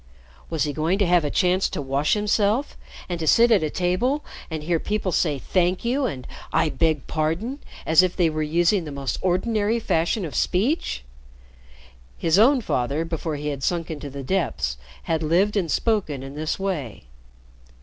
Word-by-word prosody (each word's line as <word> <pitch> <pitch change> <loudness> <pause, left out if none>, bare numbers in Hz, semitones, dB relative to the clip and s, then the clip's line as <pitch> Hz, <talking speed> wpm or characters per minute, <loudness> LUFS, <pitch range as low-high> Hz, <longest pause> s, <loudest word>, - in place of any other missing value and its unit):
Was 160 -3 0
he 145 -1 -2
going 160 +6 0
to 200 - +2
have 175 -2 +3
a 145 - -1
chance 185 +4 +2
to - - -4
wash 140 +4 +1
himself 210 +5 +1 0.3
and 175 -2 -3
to 160 - -3
sit 235 +6 +5
at 215 - +5
a 155 - 0
table 185 - 0 0.2
and 160 -2 -4
hear 165 +1 +1
people 205 -1 -2
say 155 -3 +1
"Thank 180 - 0
you," 260 +3 +1
and 130 - -6 0.3
"I 160 0 +2
beg 155 -3 0
pardon," 170 - -2 0.3
as 160 +2 +6
if 185 -1 0
they 175 -3 +3
were 155 -1 -2
using 170 +4 +2
the 150 - -6
most 140 -2 -3
ordinary 210 +4 +1
fashion 175 0 0
of 155 - -7
speech? 200 - 0 1.1
His 165 +3 +2
own 255 +4 +5
father, 140 - -1
before 165 -1 -3
he 150 +1 -3
had 140 -2 -4
sunk 170 +3 -1
into 145 -2 -6
the 140 0 -7
depths, 130 - -1 0.3
had 165 -1 -1
lived 180 +7 +2
and 185 -5 0
spoken 185 - 0
in 135 0 -8
this 155 +2 -2
way. 175 - -4
170 Hz, 180 wpm, -24 LUFS, 150-200 Hz, 1.1 s, as